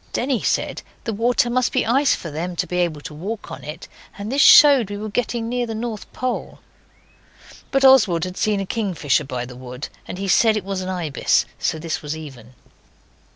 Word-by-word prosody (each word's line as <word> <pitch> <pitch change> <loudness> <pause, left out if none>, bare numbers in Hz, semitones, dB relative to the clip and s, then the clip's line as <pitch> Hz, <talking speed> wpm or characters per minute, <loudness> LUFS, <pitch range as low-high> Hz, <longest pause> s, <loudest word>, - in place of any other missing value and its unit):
Denny 255 -2 0
said - - -1 0.2
the 225 - -3
water 240 +3 +2
must 245 +1 +1
be - - +1
ice 270 +5 +3
for 165 - -8
them 175 +4 -4
to 180 - -1
be 180 +1 -2
able 165 -4 -1
to 150 - -8
walk 200 +8 -6
on - - -8
it, 150 +3 -8 0.3
and 205 +3 -5
this 280 +1 +2
showed 280 -10 +8
we 205 - -5
were 215 +1 -5
getting 235 0 -2
near 245 0 -1
the 225 - -4
North 220 -2 -5
Pole. 255 -1 -4 1.1
But 270 0 +2
Oswald 215 -11 +5
had 180 0 -4
seen 210 0 0
a 195 - -2
kingfisher 185 - 0
by 125 -2 -4
the 125 0 -11
wood, 125 +2 -8 0.2
and - - -6
he 195 +1 -4
said 220 +3 +4
it 200 - -4
was 195 -1 -3
an 185 - -5
ibis, 170 -7 +1
so 160 - -1
this 160 -1 -4
was 150 +1 -5
even. 130 -6 -11
195 Hz, 205 wpm, -21 LUFS, 160-235 Hz, 1.1 s, showed